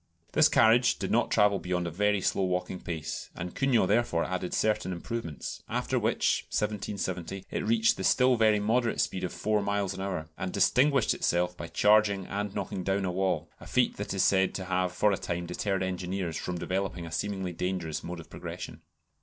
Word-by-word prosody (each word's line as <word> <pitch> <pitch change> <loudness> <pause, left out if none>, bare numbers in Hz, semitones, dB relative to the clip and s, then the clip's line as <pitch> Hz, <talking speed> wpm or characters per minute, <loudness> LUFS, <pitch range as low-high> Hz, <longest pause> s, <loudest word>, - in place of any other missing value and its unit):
This - - +5
carriage 120 +2 +4
did - - -3
not - - +2
travel 100 -1 +3
beyond 90 0 -2
a 85 - -3
very 105 +3 +1
slow 95 - +1
walking 90 0 -2
pace, 80 -2 -5
and 90 +1 -5
Cugnot 125 -8 +2
therefore 105 -5 +2
added 90 -1 -3
certain 105 -3 0
improvements, 90 -3 -5
after - - 0
which - - +1
(1770) 95 -3 -3
it - - -2
reached 115 +1 +3
the 95 - -4
still 125 +5 +4
very 110 -2 +4
moderate 115 +3 +1
speed 95 - -1
of 90 - -2
four 105 0 0
miles 100 -1 -1
an 95 - -6
hour, 95 -5 -3
and 95 - -3
distinguished 130 +5 +3
itself 90 +1 0
by 85 - -7
charging 105 0 +3
and 100 +1 -4
knocking 95 - -3
down 95 +1 0
a 90 - -1
wall, 95 +1 -1
a - - -12
feat - - +1
that - - -4
is - - +1
said 95 -1 +3
to 95 - -4
have 90 0 0
for 105 +3 +2
a 95 - 0
time 85 0 -3
deterred 95 +2 -1
engineers 90 -2 -3
from 90 +2 -3
developing 90 -1 -2
a 80 - -8
seemingly 95 +1 -2
dangerous 90 -3 -3
mode 85 0 -6
of 80 - -11
progression. - - -8
95 Hz, 195 wpm, -29 LUFS, 90-105 Hz, -, This